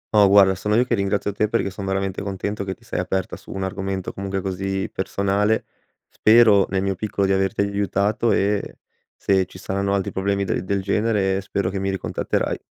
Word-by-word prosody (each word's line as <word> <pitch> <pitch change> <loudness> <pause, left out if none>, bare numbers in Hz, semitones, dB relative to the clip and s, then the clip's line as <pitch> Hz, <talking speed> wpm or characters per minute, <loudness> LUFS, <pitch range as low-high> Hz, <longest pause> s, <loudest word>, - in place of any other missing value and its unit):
No 105 -1 +7
guarda, 95 -1 +6
sono 105 +3 -1
io 120 - +5
che 125 - -1
ringrazio 100 -1 0
te, 105 +1 0
perché 110 -3 0
son 100 +1 -7
veramente 95 0 -2
contento, 100 +1 -3
che 95 -1 -4
ti - - -26
sei - - -4
aperta 95 -1 -2
su - - -16
un 95 - -4
argomento 95 -1 -3
comunque 95 0 -3
così 95 +1 -2
personale, 100 +3 0 0.4
spero, 110 -3 +5
nel 95 0 0
mio 100 0 0
piccolo, 100 +1 -2
di 95 - +2
averti 95 +2 +1
aiutato 100 +2 0
e 100 +1 0 0.4
se 95 -2 +1
ci 90 - -13
saranno 100 +1 -1
altri 95 -2 -1
problemi 100 +1 0
del 90 - -1
del 100 0 -1
genere, 100 -1 +1
spero 100 -1 -2
che 95 - -3
mi 95 0 -1
ricontatterai. 95 -1 -2
100 Hz, 195 wpm, -22 LUFS, 95-100 Hz, 0.4 s, No